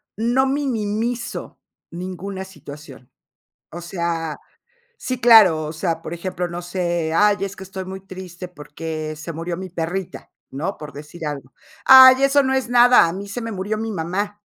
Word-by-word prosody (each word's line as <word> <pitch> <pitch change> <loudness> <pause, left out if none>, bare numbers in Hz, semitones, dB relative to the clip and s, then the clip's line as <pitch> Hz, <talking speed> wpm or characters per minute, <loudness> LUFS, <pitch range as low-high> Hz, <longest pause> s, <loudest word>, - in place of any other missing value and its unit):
no 240 +5 +1
minimizo 235 -4 -3 0.3
ninguna 185 +2 -6
situación. 145 -8 -13 0.6
O 170 - -8
sea, 170 -3 -3 0.6
sí, 255 - -4
claro, 210 -10 +6
o 155 - -5
sea, 165 0 -2
por 170 - -6
ejemplo, 180 +1 -4
no 175 +1 -5
sé, 175 -2 -2
"Ay, 205 +2 +4
es 195 0 -3
que 190 - -9
estoy 190 0 -7
muy 190 +1 -7
triste 185 -1 -9
porque 155 0 -6
se 160 +2 -7
murió 165 +2 -4
mi 185 0 -7
perrita", 175 +2 -5 0.2
¿no? 160 +9 -4
Por 150 -1 -9
decir 150 +3 -9
algo. 140 -4 -6 0.3
"Ay, 260 0 +9
eso 275 +1 +4
no 265 0 0
es 265 -2 0
nada, 245 -5 +6
a 165 - -3
mí 200 +2 -7
se 200 - -5
me 230 - -5
murió 205 +3 -3
mi 225 0 -3
mamá". 200 +4 -3
185 Hz, 170 wpm, -21 LUFS, 165-215 Hz, 0.6 s, Ay